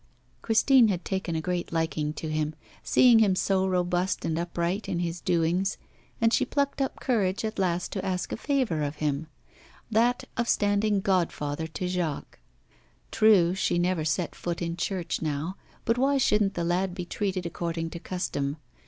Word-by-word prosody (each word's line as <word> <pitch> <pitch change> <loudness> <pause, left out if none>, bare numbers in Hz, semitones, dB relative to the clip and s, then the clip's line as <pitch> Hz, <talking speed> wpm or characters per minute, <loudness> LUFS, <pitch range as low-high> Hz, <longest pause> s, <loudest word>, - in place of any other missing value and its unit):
Christine 235 +2 +5
had 185 -4 -2
taken 190 -3 -2
a 160 - -1
great 175 +1 -2
liking 160 -2 -1
to 160 - -6
him, 155 0 -1 0.3
seeing 245 -3 +5
him 200 -4 +4
so 190 0 +1
robust 180 0 0
and 160 0 -1
upright 175 +3 -2
in 175 - -1
his 170 0 -3
doings, 180 +2 +1 0.4
and 230 0 +3
she - - +3
plucked 280 -1 -1
up 270 - -2
courage 205 -5 0
at 215 -2 -4
last 180 -2 0
to 190 - -3
ask 185 -1 -2
a - - -2
favour 250 - 0
of 145 0 -2
him: 150 0 -2 0.6
that 235 +3 +2
of 235 0 0
standing 205 0 +2
godfather 160 -5 0
to 170 +3 -4
Jacques. 175 -5 -3 0.7
True, 205 -6 +5
she 190 -2 0
never 175 -2 +1
set 160 +3 -1
foot 170 -1 -4
in 170 -1 -2
church 180 -1 -2
now, 155 +3 -2 0.3
but 230 +2 +1
why 275 +2 +3
shouldn't 210 -6 +2
the 170 - -1
lad 180 +2 0
be 180 -2 -4
treated 190 -1 -2
according 165 -1 -3
to 170 - -6
custom? 155 -6 -3
180 Hz, 170 wpm, -27 LUFS, 165-205 Hz, 0.7 s, Christine